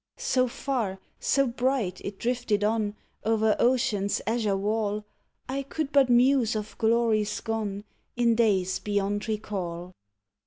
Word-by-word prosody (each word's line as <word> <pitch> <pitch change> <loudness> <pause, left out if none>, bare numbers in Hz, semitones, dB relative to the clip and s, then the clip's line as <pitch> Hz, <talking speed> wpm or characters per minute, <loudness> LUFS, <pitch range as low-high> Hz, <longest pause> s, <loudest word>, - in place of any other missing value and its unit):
So 265 - +1
far, 240 -6 -2 0.2
so 275 0 +2
bright, 245 -6 -1
it 200 -1 -5
drifted 240 -4 0
on 215 -1 0 0.3
O'er 220 -1 +2
ocean's 235 -5 +2
azure 220 -3 0
wall 210 +1 -1 0.4
I 270 +2 -2
could 280 +1 -4
but 275 -3 +4
muse 245 -1 +4
of 215 0 -4
glories 220 -2 +2
gone, 210 -3 -3 0.3
In 240 -1 +3
days 190 -5 +2
beyond 205 +1 -1
recall. 185 -5 -4
220 Hz, 125 wpm, -27 LUFS, 205-245 Hz, 0.4 s, but